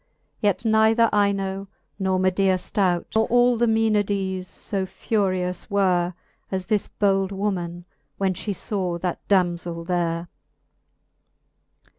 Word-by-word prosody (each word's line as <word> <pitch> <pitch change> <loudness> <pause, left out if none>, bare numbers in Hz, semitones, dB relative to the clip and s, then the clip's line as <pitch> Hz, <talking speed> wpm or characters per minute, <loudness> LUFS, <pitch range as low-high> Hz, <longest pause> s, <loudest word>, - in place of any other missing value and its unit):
Yet 205 +1 0
neither 220 +1 +4
Ino, 195 -1 0 0.3
nor 190 -1 +1
Medea 185 0 +2
flout, 180 -1 0
Nor 220 0 +3
all 245 +1 +4
the 240 - +3
Mcenades 205 -4 +1
fb 190 +1 -3
furious 185 -3 -1
were, 180 -3 +1 0.4
As 190 -1 -2
this 210 +1 0
bold 195 -1 +1
woman, 180 -4 -3 0.3
when 190 -1 +1
fhe 200 +2 -4
faw 185 -3 -2
that 175 0 -3
damzell 175 -3 0
there. 170 -1 -1
190 Hz, 115 wpm, -24 LUFS, 180-205 Hz, 0.4 s, neither